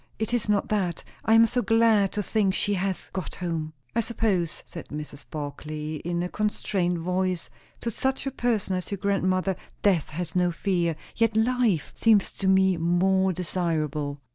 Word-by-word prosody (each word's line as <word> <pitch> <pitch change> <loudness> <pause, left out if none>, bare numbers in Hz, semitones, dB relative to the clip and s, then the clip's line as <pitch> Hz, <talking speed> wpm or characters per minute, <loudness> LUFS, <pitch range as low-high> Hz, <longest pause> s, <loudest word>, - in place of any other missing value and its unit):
It 220 +1 -2
is 235 -3 0
not 205 -1 +2
that. 185 -6 0 0.2
I 225 - +5
am 225 0 +8
so 245 +2 0
glad 225 -4 +4
to 210 - -1
think 200 -2 +1
she 205 - +1
has 190 -1 -2
got 185 -3 -4
home!" 165 -3 -3 0.2
"I - - +3
suppose," 210 -8 0
said 170 - -9
Mrs. 150 -1 -7
Barclay 155 +1 -5
in 175 +3 -2
a - - -1
constrained 190 -3 -1
voice, 180 +1 -1 0.3
"to 235 - -2
such 265 +5 -1
a 270 - -1
person 230 -7 0
as 180 - -4
your 200 - -2
grandmother, 190 -1 +1 0.3
death 185 -7 +3
has 165 +2 -5
no 180 -1 +3
fear. 170 -2 0 0.2
Yet 230 -2 +2
life 225 - +2
seems 220 -4 +4
to 195 - -1
me 190 -1 +4
more 190 +3 +3
desirable." 155 -5 -2
185 Hz, 170 wpm, -26 LUFS, 170-210 Hz, 0.3 s, am